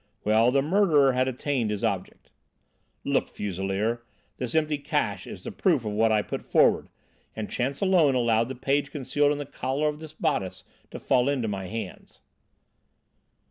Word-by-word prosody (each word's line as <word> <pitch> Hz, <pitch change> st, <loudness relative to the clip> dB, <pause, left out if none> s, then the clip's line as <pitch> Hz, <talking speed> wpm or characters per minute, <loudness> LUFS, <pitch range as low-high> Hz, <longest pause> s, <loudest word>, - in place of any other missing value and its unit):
Well, 110 Hz, +3 st, +4 dB
the 135 Hz, +2 st, +2 dB
murderer 155 Hz, -5 st, +4 dB
had 130 Hz, +1 st, +1 dB
attained 130 Hz, -2 st, -1 dB
his 105 Hz, 0 st, -3 dB
object. 100 Hz, -5 st, -3 dB, 0.7 s
"Look, -, -, +1 dB
Fuselier, 100 Hz, +4 st, -2 dB, 0.4 s
this 125 Hz, 0 st, -4 dB
empty 155 Hz, -2 st, +1 dB
'cache' -, -, -2 dB
is -, -, -9 dB
the -, -, -5 dB
proof -, -, +1 dB
of 105 Hz, -, -2 dB
what 110 Hz, +2 st, +2 dB
I 105 Hz, -1 st, +2 dB
put -, -, -5 dB
forward, -, -, +3 dB, 0.5 s
and 110 Hz, -1 st, -5 dB
chance 135 Hz, +3 st, -2 dB
alone 175 Hz, -8 st, +4 dB
allowed 115 Hz, -2 st, +2 dB
the 130 Hz, -, -5 dB
page 140 Hz, +3 st, 0 dB
concealed 145 Hz, +1 st, +1 dB
in 145 Hz, -, -1 dB
the 145 Hz, -, -4 dB
collar 135 Hz, +2 st, -2 dB
of 150 Hz, 0 st, -6 dB
this 155 Hz, -1 st, -10 dB
bodice 95 Hz, -1 st, -2 dB, 0.3 s
to -, -, -7 dB
fall 130 Hz, +1 st, +2 dB
into 130 Hz, -5 st, 0 dB
my 95 Hz, -2 st, -4 dB
hands." 110 Hz, -2 st, -7 dB
125 Hz, 170 wpm, -26 LUFS, 110-145 Hz, 0.7 s, Well